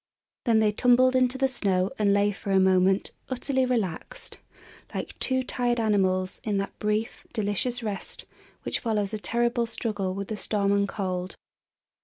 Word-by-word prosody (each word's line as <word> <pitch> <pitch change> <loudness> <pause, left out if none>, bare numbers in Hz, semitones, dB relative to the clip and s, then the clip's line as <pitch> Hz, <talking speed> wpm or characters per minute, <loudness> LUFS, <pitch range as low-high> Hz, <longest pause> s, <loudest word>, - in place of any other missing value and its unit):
Then 230 -3 +4
they 215 -1 +4
tumbled 250 +3 +4
into 255 0 +2
the 270 0 +3
snow 195 -7 0
and 205 -1 +3
lay 200 +1 +3
for 200 - -8
a 195 -1 +4
moment 190 +1 +3 0.2
utterly 260 0 0
relaxed, 235 - -3 0.6
like - - -4
two 260 0 +1
tired 245 -1 0
animals, 190 -4 +1
in 210 -2 0
that 195 0 -4
brief, 210 +1 -2
delicious 230 +3 -1
rest 205 -3 -5 0.4
which - - -1
follows 210 -3 -1
a 215 - -2
terrible 235 +2 0
struggle 205 -5 -3
with 200 0 -5
the 215 - -3
storm 200 -1 0
and 200 0 +2
cold. 185 -3 -3
210 Hz, 160 wpm, -26 LUFS, 195-245 Hz, 0.6 s, Then